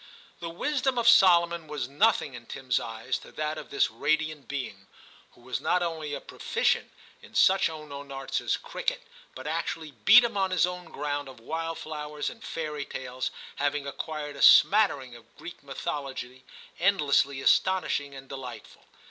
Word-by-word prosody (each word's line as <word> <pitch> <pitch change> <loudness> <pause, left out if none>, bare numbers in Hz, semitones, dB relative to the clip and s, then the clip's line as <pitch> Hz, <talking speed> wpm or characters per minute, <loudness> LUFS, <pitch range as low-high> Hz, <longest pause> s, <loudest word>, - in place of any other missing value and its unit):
The 170 - -5
wisdom 265 - -1
of 235 -1 +1
Solomon 170 -6 +6
was 145 -5 -4
nothing 145 0 +2
in 120 -1 -10
Tim 130 -1 -9
s 125 - +4
eyes 115 +3 -4
to - - -14
that 155 0 -3
of - - -10
this 140 - +1
radiant 155 -3 -1
being, 140 -1 -6 0.5
who - - -21
was - - -4
not 180 0 +2
only 160 -4 -3
a - - -5
proficient - - -1 0.3
in - - -16
such 190 -2 +5
unknown 145 -3 -8
arts 135 0 -3
as - - 0
cricket, - - -3 0.3
but - - -9
actually 160 -2 -3
beat 200 - +7
him 235 - -1
on 190 -1 +2
his 185 -2 +3
own 180 0 -6
ground 145 -1 -4
of 130 - -13
wildflowers 155 +1 -4
and 225 - -14
fairy 150 -3 -4
tales, 130 -1 -4 0.3
having 145 0 0
acquired 150 +1 -5
a 140 - -7
smattering 140 - +6
of 120 - -18
Greek 175 - -10
mythology 135 -2 -5 0.3
endlessly 145 -7 +3
astonishing 145 -3 +2
and 135 0 -10
delightful. 130 -2 -9
150 Hz, 165 wpm, -28 LUFS, 135-175 Hz, 0.5 s, beat